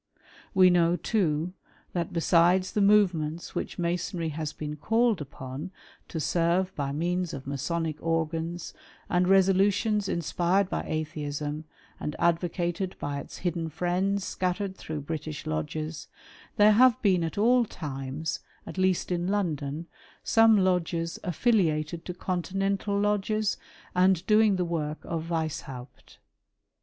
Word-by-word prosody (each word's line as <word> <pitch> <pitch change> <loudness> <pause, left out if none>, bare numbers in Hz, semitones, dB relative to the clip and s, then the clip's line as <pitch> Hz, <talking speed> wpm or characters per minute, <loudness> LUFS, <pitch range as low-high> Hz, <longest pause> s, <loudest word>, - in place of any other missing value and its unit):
We 185 -1 +7
know 170 -1 +4
too, 180 -5 0 0.4
that 170 -2 -2
besides 175 +2 +3
the 210 - 0
movements 175 -6 +2
which - - -4
Masonry 175 -1 -1
has 155 0 -4
been 150 0 -5
called 225 +4 +2
upon 135 +1 -7 0.4
to 165 - -4
serve 175 +4 +1
by 140 -2 -2
means 175 +3 -1
of 135 - -8
Masonic 155 +3 -2
organs, 165 +1 -2 0.4
and 180 0 +3
resolutions 195 +2 +3
inspired 175 +3 +1
by - - -2
Atheism, 150 -1 -3 0.3
and 150 - -4
advocated 175 +2 0
by 145 0 -3
its - - -10
hidderi 170 -2 -2
friends 185 +4 0
scattered 185 +1 -2
through 155 -4 -5
British 155 0 -5
lodges, 155 - -3 0.5
there 210 0 +7
have 240 +2 +5
been 185 -5 +3
at 165 - -4
all 240 +4 +4
times, 145 - -4 0.3
at - - -7
least 185 -1 +1
in 175 0 0
London, 165 -6 -1 0.4
some 225 -1 +5
lodges 175 -3 0
affiliated 170 -5 +1
to 180 - -4
Continental 195 +3 -1
lodges, 210 +1 +1 0.4
and 185 -1 +3
doing 215 0 +5
the 180 -1 0
work 155 -3 -2
of 165 -1 -3
Weishaupt. 145 -6 -5
175 Hz, 125 wpm, -28 LUFS, 155-190 Hz, 0.5 s, We